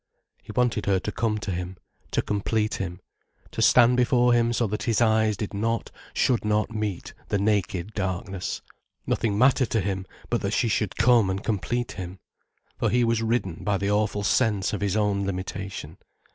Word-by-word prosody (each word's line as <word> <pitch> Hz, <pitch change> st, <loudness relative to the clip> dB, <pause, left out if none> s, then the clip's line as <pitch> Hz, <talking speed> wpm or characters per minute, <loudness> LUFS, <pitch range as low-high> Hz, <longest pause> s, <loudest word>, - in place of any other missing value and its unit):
He -, -, -10 dB
wanted 120 Hz, -4 st, 0 dB
her 95 Hz, -1 st, +3 dB
to 105 Hz, -, -4 dB
come 110 Hz, -2 st, 0 dB
to 105 Hz, -1 st, -4 dB
him, 90 Hz, +1 st, -4 dB, 0.3 s
to -, -, 0 dB
complete 105 Hz, +1 st, 0 dB
him, 90 Hz, -1 st, -4 dB, 0.5 s
to -, -, -3 dB
stand 125 Hz, 0 st, +6 dB
before 125 Hz, 0 st, +4 dB
him 120 Hz, 0 st, +3 dB
so 120 Hz, 0 st, +1 dB
that 105 Hz, 0 st, -3 dB
his 115 Hz, -3 st, +1 dB
eyes 110 Hz, -2 st, +3 dB
did 105 Hz, -1 st, -4 dB
not, 115 Hz, +3 st, -1 dB, 0.2 s
should 125 Hz, -3 st, +2 dB
not 105 Hz, +1 st, 0 dB
meet 105 Hz, -4 st, -3 dB
the -, -, 0 dB
naked 100 Hz, -1 st, 0 dB
darkness. 95 Hz, -1 st, -3 dB, 0.4 s
Nothing 105 Hz, -3 st, 0 dB
mattered 130 Hz, +1 st, +4 dB
to 115 Hz, -, +1 dB
him 95 Hz, -1 st, -2 dB, 0.2 s
but 120 Hz, -, +1 dB
that 100 Hz, +1 st, -2 dB
she 120 Hz, -, +2 dB
should 105 Hz, -3 st, 0 dB
come 115 Hz, -3 st, +4 dB
and 95 Hz, +2 st, -2 dB
complete 120 Hz, +3 st, -1 dB
him. 95 Hz, -1 st, -7 dB, 0.6 s
For -, -, +2 dB
he 125 Hz, 0 st, +3 dB
was 115 Hz, -1 st, +1 dB
ridden 110 Hz, -7 st, -1 dB
by 100 Hz, -1 st, +1 dB
the 100 Hz, +2 st, -1 dB
awful 105 Hz, 0 st, 0 dB
sense 105 Hz, -3 st, +1 dB
of 105 Hz, -, -3 dB
his 100 Hz, +1 st, 0 dB
own 100 Hz, -2 st, +1 dB
limitation. 95 Hz, -3 st, -5 dB
105 Hz, 185 wpm, -25 LUFS, 100-115 Hz, 0.6 s, stand